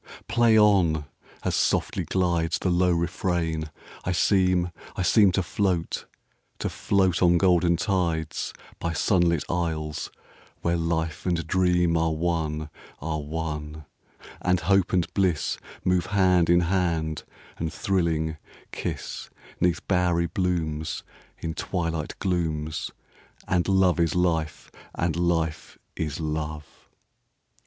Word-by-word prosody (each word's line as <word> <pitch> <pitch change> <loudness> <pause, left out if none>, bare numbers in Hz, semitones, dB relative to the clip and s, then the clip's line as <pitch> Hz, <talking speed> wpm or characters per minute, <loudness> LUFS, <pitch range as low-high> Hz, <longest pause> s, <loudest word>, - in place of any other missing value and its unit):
Play 115 -2 +4
on! 90 -8 +4 0.4
As - - 0
softly - - +1
glidesThe 85 -1 +1
low 90 +1 +3
refrain, 85 -2 -1 0.3
I 90 - -1
seem, 90 -1 +2 0.2
I 95 - -1
seemTo 95 -1 +4
float, 90 -1 -1 0.5
to - - -2
float 95 -3 +1
on 85 -1 +5
golden 85 -2 +3
tides, 85 -5 -1 0.3
By 85 - -2
sunlit 85 -2 +2
isles, 80 -3 -2 0.5
where 85 0 +1
life 80 -1 -2
and 90 -1 +2
dreamAre 85 -3 +2
one, 80 -2 -1 0.3
are 80 +1 -2
one; 75 0 -5 0.6
and 90 -1 +2
hope 95 +2 +3
and 90 -3 +2
blissMove 90 0 0
hand 90 -4 +3
in 85 0 +5
hand, 85 -4 0 0.4
and 80 0 -2
thrilling, 80 -4 0 0.3
kiss'Neath 90 -2 -3
bowery 90 -2 +2
blooms, 80 -3 -2 0.3
In 80 -1 -4
twilight 85 -3 -3
glooms, 80 -5 -1 0.6
And 90 -1 +1
love 95 -2 +3
is 85 0 +2
life, 80 -3 0 0.2
and 85 -1 0
life 85 -2 -1 0.2
is 75 -2 -3
love. 75 -1 -3
85 Hz, 110 wpm, -26 LUFS, 80-90 Hz, 0.6 s, on